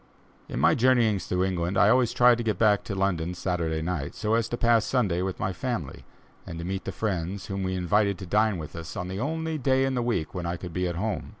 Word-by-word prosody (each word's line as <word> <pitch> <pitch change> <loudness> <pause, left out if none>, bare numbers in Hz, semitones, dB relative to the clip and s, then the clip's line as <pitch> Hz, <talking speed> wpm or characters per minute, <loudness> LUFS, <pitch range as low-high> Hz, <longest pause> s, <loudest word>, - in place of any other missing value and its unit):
In - - -3
my - - +5
journeyings 115 -5 +2
through 90 0 0
England, 90 0 -1
I 105 - +6
always 125 0 +4
tried 120 -1 +5
to - - -1
get 110 -4 0
back 105 -1 +3
to 100 - -4
London 90 -3 -1
Saturday 85 -3 -2
night, 80 -5 -3
so 110 0 -1
as 115 -1 +1
to 120 - -2
pass 115 -2 +3
Sunday 100 -10 0
with 95 0 -3
my 95 - -1
family, 90 - -4 0.4
and 80 - -8
to 85 - -5
meet 95 +1 -4
the - - -3
friends 95 -2 -3
whom 95 0 -4
we 95 0 -1
invited 100 +2 +1
to 95 - -7
dine 105 +2 +2
with 80 -1 -8
us 85 -1 -7
on 90 - -4
the 95 +1 -4
only 160 +4 -2
day 135 0 +2
in 135 - -1
the 125 - 0
week 115 -10 -1
when 90 -2 -4
I 85 +1 -2
could 85 -1 -8
be 90 +1 0
at 85 - -3
home. 105 +4 -3
95 Hz, 255 wpm, -26 LUFS, 90-115 Hz, 0.4 s, I